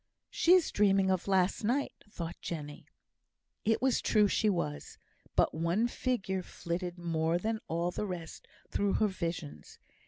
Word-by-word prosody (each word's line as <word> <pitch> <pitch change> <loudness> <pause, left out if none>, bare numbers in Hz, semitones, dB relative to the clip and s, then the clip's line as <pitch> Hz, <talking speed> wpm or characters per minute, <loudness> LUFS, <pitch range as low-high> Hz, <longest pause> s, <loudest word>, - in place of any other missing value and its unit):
"She 345 - +4
is 370 -3 +4
dreaming 195 -2 +3
of 185 0 -1
last 190 +1 +2
night," 255 +6 0 0.2
thought 170 -5 -5
Jenny. 150 -3 -6 0.8
It 225 +3 +2
was 265 -2 +3
true 210 -2 +4
she 215 +2 +2
was; 170 -6 -3 0.4
but - - +3
one 170 +8 +1
figure 215 -7 -1
flitted 175 0 -4
more 165 -1 0
than 220 +4 -2
all 170 +2 -1
the 210 - -3
rest 170 -4 -7 0.2
through 200 -1 +1
her 215 - +3
visions. 165 - -5
185 Hz, 150 wpm, -31 LUFS, 170-210 Hz, 0.8 s, She